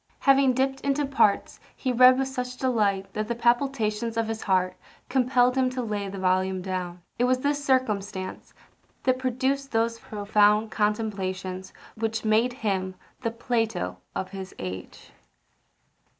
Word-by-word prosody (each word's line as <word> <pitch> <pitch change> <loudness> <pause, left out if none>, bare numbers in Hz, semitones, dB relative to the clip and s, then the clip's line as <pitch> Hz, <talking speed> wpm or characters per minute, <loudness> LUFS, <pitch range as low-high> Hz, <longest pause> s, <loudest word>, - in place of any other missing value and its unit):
Having 270 -2 +4
dipt 270 +1 0
into 280 +1 +1
parts, 265 -7 +2 0.2
he 260 - -2
read 255 +1 +7
with 270 0 0
such 250 -1 -4
delight 210 -7 0
that 215 0 -2
the 235 - -2
palpitations 235 -2 +1
of 225 -1 +1
his 225 0 -4
heart 185 -2 +1 0.3
compelled 250 -1 +3
him 260 -1 +2
to 255 0 -3
lay 205 -3 -3
the 195 - -7
volume 185 0 +1
down. 180 -1 -4 0.2
It 245 - +4
was 255 0 +3
this 285 +2 -1
circumstance 205 -8 -1 0.5
that 255 0 +2
produced 265 +2 -1
those 230 0 0
profound 210 +1 +2
contemplations 195 -3 -2 0.2
which 225 0 -2
made 220 +3 +3
him 190 -2 -1 0.3
the 230 - 0
Plato 225 -4 -1 0.2
of 190 - -3
his 190 -1 -8
age. 95 0 -7
225 Hz, 145 wpm, -26 LUFS, 195-255 Hz, 0.5 s, read